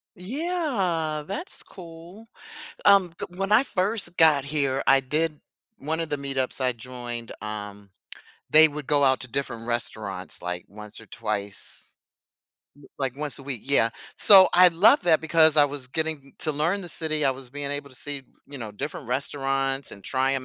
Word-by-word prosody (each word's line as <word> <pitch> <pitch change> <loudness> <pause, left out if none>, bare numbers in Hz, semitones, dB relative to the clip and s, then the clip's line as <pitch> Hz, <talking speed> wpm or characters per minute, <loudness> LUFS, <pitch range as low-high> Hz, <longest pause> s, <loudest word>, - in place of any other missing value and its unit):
Yeah, 195 - -2
that's 325 - -5
cool. 175 +5 -13 0.6
Um, 195 -4 +5
g - - -4
when 195 +2 -2
I 225 +5 +6
first 200 -4 -2
got 155 -4 +5
here, 140 -2 -1
I 135 - +5
did 150 +3 -2 0.4
one 160 +3 -3
of 165 - -3
the 145 - -2
meetups 135 -2 -3
I 130 -1 +1
joined, 120 -1 -7
um, 105 -2 -7 0.6
they 155 +1 +8
would 150 -1 -7
go 145 -1 +2
out 130 -1 +3
to 130 - -6
different 120 -2 -4
restaurants, 105 -5 -4
like, 90 0 -4
once 105 +1 -11
or 115 - -14
twice. 105 -2 -6 0.9
L 145 - -17
like 135 -2 -2
once 150 -1 -4
a 135 - -11
week, 135 -5 -2
yeah. 135 -4 +5 0.3
So 195 -2 +8
I 180 +1 +7
love 205 - +5
that 160 -3 +3
because 160 -1 +4
I 145 - +7
was 145 -2 -5
getting 160 +4 -1
m 140 - -19
to 155 - 0
learn 165 +7 0
the 180 - -8
city, 155 -2 -1
I 135 - +4
was 130 -1 -8
being 145 +1 -5
able 145 0 -4
to - - -14
see, 145 0 -3 0.3
you 140 - -8
know, 110 -3 -7
different 140 +3 -5
restaurants 135 +1 -1
and 100 - -10
try 130 +4 0
'em 130 - -2
145 Hz, 180 wpm, -25 LUFS, 130-165 Hz, 0.9 s, they